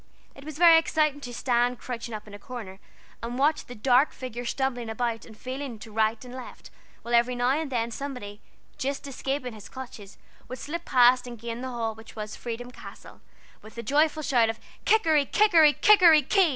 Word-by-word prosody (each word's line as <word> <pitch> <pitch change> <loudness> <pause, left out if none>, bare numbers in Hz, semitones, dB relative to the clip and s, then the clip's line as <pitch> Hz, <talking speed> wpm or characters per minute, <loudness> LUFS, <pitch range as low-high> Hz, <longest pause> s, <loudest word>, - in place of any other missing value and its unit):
It 275 - -14
was 305 0 -8
very 335 -1 +8
exciting 305 -3 0
to 245 - -7
stand 245 0 0
crouching 235 -1 -6
up 210 - -8
in 210 - -13
a 205 - -9
corner 205 -4 -9 0.4
and 240 +1 -5
watch 295 +3 +1
the 245 - -9
dark 255 +5 +3
figure 245 -1 -7
stumbling 245 -2 -2
about 230 0 -2
and 220 -2 -14
feeling 260 -1 -6
to 220 +1 -12
right 220 +2 0
and 250 - -10
left, 255 -1 -10 0.3
while 235 - -5
every 240 +1 +3
now 245 +1 +1
and 295 0 -1
then 235 -2 -1
somebody, 235 -6 -7 0.4
just 275 +2 -3
escaping 270 -2 -4
his 215 -2 -12
clutches, 240 -6 -10 0.3
would 255 - -7
slip 340 +5 -6
past 250 0 +4
and 240 -1 -8
gain 235 +1 -6
the 260 - -4
hall, 230 -3 -3
which 220 +1 -14
was 215 -1 -6
"Freedom 245 +1 -6
Castle," - - -13 0.4
with 220 +2 -15
a 235 - -5
joyful 305 +5 +2
shout 240 -5 +3
of 225 - -4 0.3
"Kikeri, 320 -10 +3
Kikeri, 330 -9 +5
Kikeri, 345 -9 +6
Ki!" 385 -4 +4
250 Hz, 195 wpm, -26 LUFS, 230-285 Hz, 0.4 s, very